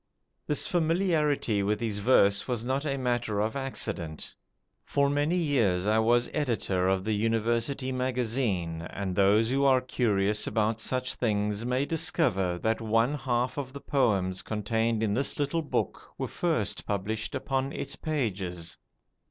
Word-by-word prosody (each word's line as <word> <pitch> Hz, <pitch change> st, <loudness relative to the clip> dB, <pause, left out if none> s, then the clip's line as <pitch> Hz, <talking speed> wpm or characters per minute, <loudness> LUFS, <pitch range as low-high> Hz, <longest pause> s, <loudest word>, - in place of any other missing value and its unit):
This 150 Hz, -, +2 dB
familiarity 160 Hz, -, +1 dB
with 105 Hz, +1 st, 0 dB
his 110 Hz, -3 st, -2 dB
verse 100 Hz, -3 st, +4 dB
was 120 Hz, -3 st, -2 dB
not 135 Hz, +4 st, -1 dB
a 140 Hz, -1 st, -1 dB
matter 120 Hz, -5 st, -1 dB
of 110 Hz, +4 st, 0 dB
accident. 105 Hz, -, -4 dB, 0.5 s
For 140 Hz, 0 st, +1 dB
many 145 Hz, +5 st, +1 dB
years 115 Hz, -, +1 dB
I 110 Hz, +1 st, +3 dB
was 120 Hz, +2 st, +3 dB
editor 110 Hz, -, 0 dB
of 95 Hz, 0 st, +1 dB
the 110 Hz, +1 st, 0 dB
'University 115 Hz, +5 st, 0 dB
Magazine', 120 Hz, -9 st, -1 dB
and 95 Hz, -2 st, -4 dB
those 105 Hz, +4 st, +4 dB
who 135 Hz, +1 st, +2 dB
are 135 Hz, -2 st, +5 dB
curious 105 Hz, -5 st, 0 dB
about 110 Hz, 0 st, 0 dB
such 130 Hz, +2 st, -1 dB
things 105 Hz, -1 st, -1 dB
may 130 Hz, +2 st, +1 dB
discover 150 Hz, -, 0 dB
that 110 Hz, +1 st, +1 dB
one 115 Hz, +4 st, +2 dB
half 130 Hz, -1 st, -1 dB
of 130 Hz, -2 st, -6 dB
the 140 Hz, -, -7 dB
poems 100 Hz, -11 st, +1 dB
contained 110 Hz, +1 st, -1 dB
in 105 Hz, -2 st, +1 dB
this 135 Hz, +6 st, -1 dB
little 145 Hz, +3 st, 0 dB
book 155 Hz, -, -2 dB, 0.2 s
were -, -, -2 dB
first -, -, -1 dB
published 105 Hz, +5 st, -2 dB
upon 135 Hz, +1 st, -1 dB
its -, -, -4 dB
pages. 95 Hz, -, -3 dB
115 Hz, 150 wpm, -28 LUFS, 105-135 Hz, 0.5 s, are